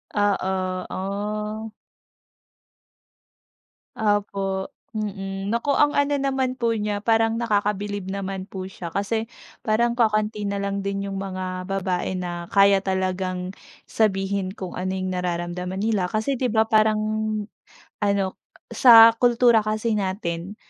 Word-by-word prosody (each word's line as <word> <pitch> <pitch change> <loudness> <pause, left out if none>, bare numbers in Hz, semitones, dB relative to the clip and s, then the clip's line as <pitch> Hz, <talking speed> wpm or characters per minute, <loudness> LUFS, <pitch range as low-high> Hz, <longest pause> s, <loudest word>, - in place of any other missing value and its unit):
Oo, 190 -2 0
ah! 210 +3 -3 2.3
Opo, 200 -2 -1 0.3
mm. 195 -2 -4
Naku, 235 +5 0
ang 295 0 +4
ano 285 0 +2
naman 265 -2 -1
po 230 -1 +1
niya, 210 -1 -2
parang 225 +1 +2
nakakabilib 205 -3 -1
naman 195 -1 -4
po 185 -1 -6
siya, 175 -3 -8
kasi 220 +4 -2 0.3
parang 235 +2 +2
kakaunti 215 -2 +1
na 200 0 -2
lang 200 0 -2
din 200 0 -2
yung 195 - -4
mga 185 -1 -4
babae 185 -1 -1
na 175 -1 -5
kaya 195 -1 +5
talagang 185 -1 -2 0.3
sabihin 195 -2 0
kung 185 -2 -7
ano 185 +1 -2
yung 185 0 -2
nararamdaman 180 +1 -3
nila. 205 -4 0
Kasi, 220 +6 0
di 250 -1 -1
ba, 220 0 +3
parang 215 -1 +3 1.0
ano 200 -1 +2 0.5
sa 230 -2 +9
kultura 240 -1 +4
kasi 215 +1 -1
natin, 190 -1 -3
200 Hz, 120 wpm, -24 LUFS, 190-220 Hz, 2.3 s, sa